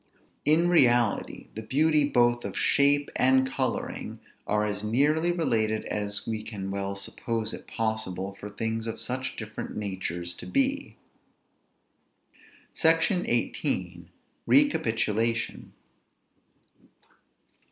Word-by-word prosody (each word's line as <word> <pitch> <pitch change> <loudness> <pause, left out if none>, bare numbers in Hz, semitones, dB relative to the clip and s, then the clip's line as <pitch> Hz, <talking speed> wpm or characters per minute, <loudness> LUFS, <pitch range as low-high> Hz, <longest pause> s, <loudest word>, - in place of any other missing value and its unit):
In 160 +3 +4
reality, 120 -10 +2
the 110 - -6
beauty 145 +5 +2
both 120 -2 +3
of - - -5
shape 145 0 +3
and 130 0 +4
coloring 130 -1 -3 0.3
are 105 0 +1
as 105 -1 -3
nearly 150 +10 +2
related 110 -10 0
as 105 -1 -1
we 110 -1 -2
can 100 -3 -6
well 100 0 -3
suppose 110 +3 -2
it - - -9
possible 110 -4 -2
for 100 +1 -9
things 110 +2 -3
of 115 - -4
such 130 +1 -3
different 110 -1 -7
natures 90 -4 -3
to - - -8
be. 275 +1 0 1.8
SECTION 165 +3 +3
XVIII. - - -2 0.4
RECAPITULATION. 115 - +1
115 Hz, 105 wpm, -27 LUFS, 105-145 Hz, 1.8 s, In